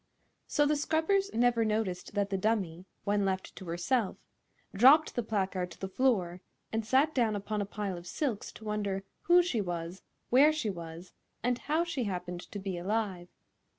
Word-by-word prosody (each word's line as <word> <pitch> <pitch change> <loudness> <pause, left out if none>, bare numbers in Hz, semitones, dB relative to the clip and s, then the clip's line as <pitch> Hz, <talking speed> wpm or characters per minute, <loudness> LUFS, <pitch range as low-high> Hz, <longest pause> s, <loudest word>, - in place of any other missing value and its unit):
So 295 - +2
the 300 +1 +2
scrubbers 320 +7 +1
never 235 0 +3
noticed 210 -3 -2
that 200 -1 0
the 195 - +1
dummy, 185 -5 -1 0.2
when 205 0 +1
left 190 -1 -2
to 190 - -8
herself, 180 +6 0 0.6
dropped 270 +10 +6
the 240 - 0
placard 190 -4 -1
to - - -13
the 190 - -3
floor 190 -6 +1 0.3
and 225 0 0
sat 270 +7 +3
down 230 -5 +2
upon 205 +1 -2
a 200 - -3
pile 200 -5 -3
of 175 - -13
silks 235 - -2
to 220 - -12
wonder 205 -2 -2 0.2
who 350 +1 +5
she 255 -11 0
was, 175 0 -4 0.3
where 280 +5 +7
she 300 -9 -1
was, 170 0 -9 0.3
and 245 0 +1
how 315 +3 +1
she 300 -8 -2
happened 180 -2 -4
to - - -5
be 190 -3 -4
alive. 190 -2 -2
210 Hz, 180 wpm, -31 LUFS, 185-250 Hz, 0.6 s, where